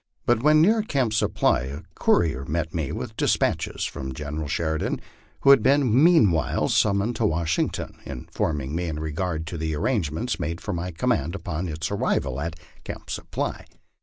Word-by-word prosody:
But 120 -2 +3
when 155 +3 +5
near 220 +5 +4
Camp 135 - 0
Supply 110 - +2
a 70 +3 -6
courier 80 -6 +2
met 80 +1 -2
me 80 -5 -2
with - - -5
despatches - - 0
from 65 -1 -5
General 75 +1 -4
Sheridan 80 +1 -1 0.4
who 140 - +7
had 135 -4 +7
been 135 0 +4
meanwhile 110 - +4
summoned 100 +3 +2
to 115 - +1
Washington 80 -2 -1
informing 70 +1 -3
me 90 +1 -1
in 75 -2 -3
regard 80 +1 -2
to 80 0 -5
the 80 -1 -1
arrangements 100 - -1
made 85 +3 -3
for 105 - -4
my 85 +1 -3
command 80 0 0
upon 90 -1 -3
its 80 -1 -3
arrival 65 -1 0
at 80 0 -4 0.2
Camp - - -7
Supply. - - -3
85 Hz, 165 wpm, -25 LUFS, 75-110 Hz, 0.4 s, who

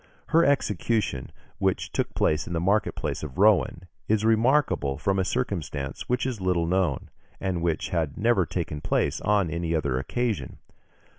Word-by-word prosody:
Her 165 +2 +5
execution, 110 - 0 0.3
which 95 -2 0
took - - -2
place 75 - +1
in 85 - -4
the 85 - 0
market 100 +5 +1
place - - -3
of 75 -4 -7
Rouen, 100 -3 +3 0.2
is 110 0 +2
remarkable 115 - +2
from 95 +5 0
a - - +2
circumstance 85 - -3
which 125 0 +1
is 125 -6 -3
little 90 -2 +1
known, 85 -5 0 0.3
and 95 -3 -2
which 85 -2 -1
had 80 -5 -1
never 110 -6 +2
taken 80 -3 -3
place - - 0
on 100 -5 +2
any 85 0 -1
other 70 -5 0
occasion. 115 - -2
95 Hz, 160 wpm, -26 LUFS, 80-110 Hz, 0.3 s, Her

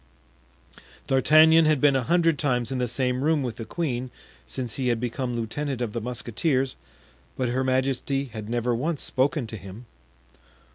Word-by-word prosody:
D'Artagnan 155 +4 +6
had 155 -2 +3
been 140 0 +4
a 135 - +2
hundred 165 +2 +2
times 125 -5 0
in 130 - -2
the 125 - 0
same 125 +2 -1
room 155 -2 +2
with 120 -3 -4
the 115 - -6
queen 130 -2 -3 0.4
since 125 -4 -4
he 130 +1 -2
had 120 -2 +1
become 125 +1 -3
lieutenant 130 +4 -3
of 120 -4 -3
the 115 - -3
musketeers, 130 +3 -1 0.6
but 130 -2 0
her 130 +2 0
majesty 135 +1 0
had 110 -4 -8
never 120 +1 0
once 145 +6 -2
spoken 140 +1 0
to 110 0 -7
him. 100 +5 -11
130 Hz, 170 wpm, -25 LUFS, 120-145 Hz, 0.6 s, D'Artagnan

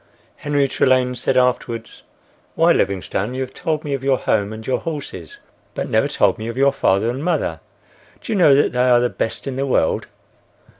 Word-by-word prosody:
Henry 145 -1 0
Trelane 130 -1 +2
said 125 +2 0
afterwards, 120 -2 -1 0.5
"Why, - - +4
Livingstone, 100 +4 -1
you 130 - -3
have 130 0 -5
told 155 -2 -2
me 145 - -3
of 135 -1 -3
your 135 -1 +2
home 105 -3 0
and 110 0 -8
your 130 - 0
horses, 140 - -7 0.4
but - - -3
never - - +3
told - - +1
me 110 - -5
of 115 +1 -5
your 140 +1 +3
father 100 +4 +1
and 130 +4 -5
mother. 155 - -1 0.6
Do - - -7
you - - 0
know 160 -8 +6
that 145 - +3
they 125 +1 +2
are 120 -1 +5
the 120 0 0
best 115 - -3
in 135 -2 -4
the 135 +1 -1
world?" 105 -10 +1
130 Hz, 200 wpm, -20 LUFS, 115-140 Hz, 0.6 s, know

